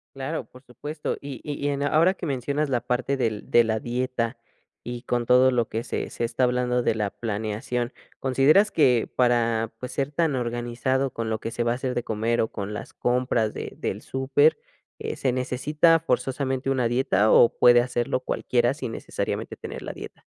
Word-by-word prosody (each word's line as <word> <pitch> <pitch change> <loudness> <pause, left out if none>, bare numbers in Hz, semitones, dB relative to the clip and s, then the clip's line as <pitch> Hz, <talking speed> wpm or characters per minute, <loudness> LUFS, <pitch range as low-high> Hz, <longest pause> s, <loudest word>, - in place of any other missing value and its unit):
Claro, 135 +4 -3
por 125 +1 -18
supuesto, 145 +5 -5
y 140 -4 -7
y 145 -1 -4
y - - +2
en 140 0 -1
ahora 165 +6 +4
que 180 - -6
mencionas 140 +2 -1
la 125 -3 +1
parte 130 +3 -1
del 115 -5 -2
de 120 - +6
la 110 -1 0
dieta 120 0 -2 0.4
y 120 0 -6
con 120 -1 -1
todo 125 +2 +5
lo 120 -2 +1
que 115 +2 -3
se - - -3
se - - -3
está 115 +2 -1
hablando 125 0 +1
de 110 - +1
la 105 -2 -1
planeación, 110 +3 -3 0.3
consideras 140 +10 +4
que 125 -7 +3
para, 115 -2 +2
pues, 125 - -6
ser 140 0 -1
tan 155 -1 +1
organizado 120 +2 -1
con 115 -1 -3
lo 110 - -1
que 115 - -5
se 120 - -1
va 120 - +1
a - - 0
hacer 130 0 -3
de 120 - -1
comer, 115 +1 0
o 110 - +1
con 105 0 -5
las - - -7
compras 120 -3 0
de - - -6
del - - -4
súper, 140 +4 +2 0.4
eh, - - -4
¿se 130 - 0
necesita 150 +6 +2
forzosamente 130 -1 -1
una 130 -3 +1
dieta, 120 -4 +2
o 120 - +7
puede 120 0 +7
hacerlo 120 0 -1
cualquiera, 125 -1 0
sin 145 -6 -5
necesariamente - - -4
tener - - -7
la - - -5
dieta? - - -10
125 Hz, 195 wpm, -25 LUFS, 120-135 Hz, 0.4 s, o